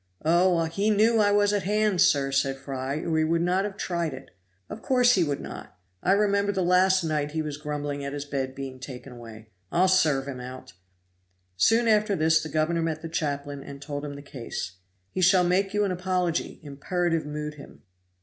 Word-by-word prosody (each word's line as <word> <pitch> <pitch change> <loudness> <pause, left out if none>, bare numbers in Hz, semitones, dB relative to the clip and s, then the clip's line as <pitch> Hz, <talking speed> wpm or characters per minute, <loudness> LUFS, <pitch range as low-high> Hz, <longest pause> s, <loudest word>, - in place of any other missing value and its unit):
"Oh! 175 +1 +3
he 195 +6 -1
knew 220 +2 +4
I 205 -1 +4
was 205 0 +3
at 205 - +1
hand, 210 -1 +1
sir," 140 -7 +3
said 135 0 +1
Fry, 135 0 -4
"or 160 -1 0
he - - +3
would 165 +1 +1
not 185 +3 +1
have 205 -1 -6
tried 170 -7 -2
it." 135 - -13 0.4
"Of 220 - -8
course 250 -2 +4
he 185 - +3
would 145 -3 -2
not; 95 - -9 0.2
I 190 - +3
remember 200 0 +2
last 185 +1 +3
night 150 -2 -1
he 160 -1 -1
was 150 -2 -5
grumbling 145 -1 -4
at 140 - -4
his 145 0 -4
bed 135 -2 -3
being 135 -1 -7
taken 130 -1 -9
away. 115 -2 -12 0.2
I'll 180 +2 +3
serve 155 -8 +3
him 135 -2 -6
out!" 125 -6 -9 0.8
Soon 225 - +3
after 210 -2 +3
this 160 0 +3
the 160 - -6
governor 160 +2 0
met 160 -1 -2
the 165 - -5
chaplain 145 -3 -3
and 140 0 -10
told 145 0 -5
him 145 -1 -6
the 140 - -10
case. 115 -9 -6 0.3
"He 185 - -3
shall 180 0 +5
make 190 +2 +1
you 210 0 +1
an 195 - -1
apology" 180 -2 -1
imperative 165 +3 -2
mood 150 0 -4
him. 145 -1 -14
160 Hz, 200 wpm, -26 LUFS, 140-185 Hz, 0.8 s, shall